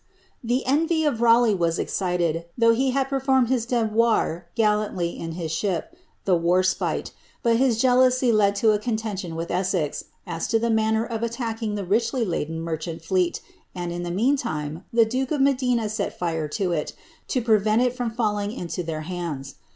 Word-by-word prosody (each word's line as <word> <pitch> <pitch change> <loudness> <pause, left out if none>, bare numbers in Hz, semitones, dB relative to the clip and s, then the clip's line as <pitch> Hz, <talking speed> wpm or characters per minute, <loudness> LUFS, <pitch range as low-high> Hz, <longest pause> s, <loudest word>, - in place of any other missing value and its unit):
' 235 - -13
e 255 +2 +1
envy 315 +4 +2
of 240 -6 0
Raleigh 235 -1 +5
was 170 -3 0
excited, 175 -3 -1
though 230 -1 +5
he 265 +3 +1
had 270 +1 +1
performed 265 -2 +2
his 245 -3 0
de 240 -2 +1
■ilanUy 210 -3 0
in 165 0 -5
his 165 -2 -4
ship, 190 - -2 0.3
the 185 - +4
^ - - -7
Warspite;" 185 +2 +1 0.3
but 230 -2 +3
his 245 -3 +2
jealousy 255 0 +4
led 205 -2 +3
to 215 +2 +3
a 210 - +1
con 230 +1 -1
D 205 -5 -4
with 165 +1 -4
Essex, 180 -4 -1 0.2
as - - -3
to 225 - +2
the 230 +1 0
manner 220 0 +2
of 230 -2 -4
attacking 230 -2 -3
the 200 -2 -3
richly 230 +5 +1
laden 165 -3 -3
mer 165 -1 -3
fleet, 170 +2 -1 0.3
and, 175 -1 -4
in 175 0 -4
the 175 - -4
meantime, 175 - -1
the 230 -1 +5
duke 255 +3 -2
of 300 - -1
Medina 250 -4 +2
set 210 -1 -3
fite 165 -3 -2
to 190 -4 0
it, 155 -3 -2 0.3
to 255 - 0
Qt 215 -2 +3
it 250 - 0
from 245 -2 -2
fitlling 210 -1 -1
into 175 +1 -4
their 160 -2 -4
hands. 155 -6 -5
215 Hz, 185 wpm, -24 LUFS, 175-240 Hz, 0.3 s, Raleigh